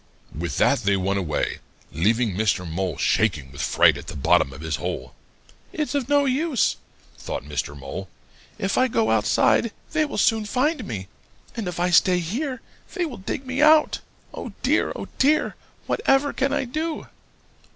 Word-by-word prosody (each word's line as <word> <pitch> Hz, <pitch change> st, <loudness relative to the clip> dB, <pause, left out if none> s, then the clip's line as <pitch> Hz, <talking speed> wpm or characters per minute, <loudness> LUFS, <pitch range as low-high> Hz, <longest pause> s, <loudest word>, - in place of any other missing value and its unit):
"With 80 Hz, -4 st, -3 dB
that -, -, +4 dB
they 100 Hz, -3 st, +1 dB
went 95 Hz, +1 st, 0 dB
away, 80 Hz, -6 st, -2 dB, 0.3 s
leaving 110 Hz, +7 st, +1 dB
Mr. 100 Hz, -3 st, 0 dB
Mole 85 Hz, -1 st, -2 dB
shaking 70 Hz, -2 st, +1 dB
with 70 Hz, -, -7 dB
fright -, -, +4 dB
at -, -, -11 dB
the -, -, -6 dB
bottom 70 Hz, -1 st, +3 dB
of 70 Hz, +2 st, -10 dB
his 80 Hz, 0 st, -2 dB
hole. -, -, -5 dB, 0.6 s
'It's 300 Hz, -4 st, -2 dB
of 280 Hz, -3 st, -1 dB
no 285 Hz, 0 st, +4 dB
use,' 275 Hz, 0 st, +1 dB, 0.4 s
thought -, -, -5 dB
Mr. 75 Hz, -1 st, -4 dB
Mole. 70 Hz, +7 st, -7 dB, 0.5 s
'If 195 Hz, 0 st, 0 dB
I 255 Hz, -, +4 dB
go 225 Hz, -2 st, +1 dB
outside, 110 Hz, -, +3 dB, 0.2 s
they 310 Hz, -1 st, +2 dB
will 290 Hz, -, -5 dB
soon 220 Hz, -2 st, +2 dB
find 255 Hz, +4 st, 0 dB
me, 95 Hz, -4 st, -5 dB, 0.5 s
and 225 Hz, -5 st, -3 dB
if 175 Hz, -1 st, -4 dB
I 180 Hz, +1 st, +1 dB
stay 180 Hz, +1 st, +5 dB
here, 245 Hz, -, -3 dB, 0.3 s
they 355 Hz, -, 0 dB
will 275 Hz, -7 st, -6 dB
dig 205 Hz, +7 st, -5 dB
me 260 Hz, +2 st, -2 dB
out. 305 Hz, 0 st, +5 dB, 0.3 s
Oh, -, -, -7 dB
dear, -, -, +2 dB
oh, -, -, -6 dB
dear! 295 Hz, +3 st, +3 dB, 0.3 s
What -, -, -1 dB
ever 270 Hz, +1 st, +4 dB
can 275 Hz, +1 st, 0 dB
I 285 Hz, -, 0 dB
do?' 310 Hz, +5 st, -3 dB
195 Hz, 175 wpm, -24 LUFS, -, 0.6 s, stay